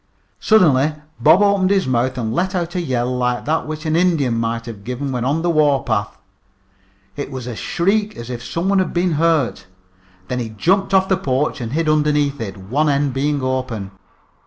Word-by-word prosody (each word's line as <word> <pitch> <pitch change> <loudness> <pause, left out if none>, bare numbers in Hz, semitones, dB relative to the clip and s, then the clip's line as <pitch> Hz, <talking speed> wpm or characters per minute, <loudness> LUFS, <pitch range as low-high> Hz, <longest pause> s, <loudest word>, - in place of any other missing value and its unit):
Suddenly 155 -9 +4 0.2
Bob 195 - +5
opened 200 -2 +3
his 195 -1 +2
mouth 130 0 0
and 115 -2 -2
let 185 +7 -1
out 175 -1 -2
a 180 - -1
yell 125 -5 -1
like 125 -1 -1
that 155 +1 0
which 155 +1 -6
an 155 0 0
Indian 165 -8 +2
might 115 0 -2
have 110 -4 -9
given 125 +4 -4
when 125 -2 -2
on 145 +6 0
the 175 - +1
warpath. 135 -9 +1 1.0
It 145 - -5
was 130 -3 -6
a 125 -2 -5
shriek 205 - 0
as 120 +1 -7
if 120 0 -6
some 170 +8 -3
one 195 0 +3
had 185 - -1
been 175 +1 +1
hurt. 150 - +1 0.6
Then 125 - -2
he 115 -2 -4
jumped 185 - +1
off 190 -1 +4
the 190 - +2
porch 135 -4 -1
and 115 +1 -5
hid 165 +1 0
underneath 150 -2 +1
it, 100 -2 -5
one 130 +11 0
end 140 -1 +1
being 140 +1 -1
open. 130 -6 -3
145 Hz, 195 wpm, -19 LUFS, 125-170 Hz, 1.0 s, Bob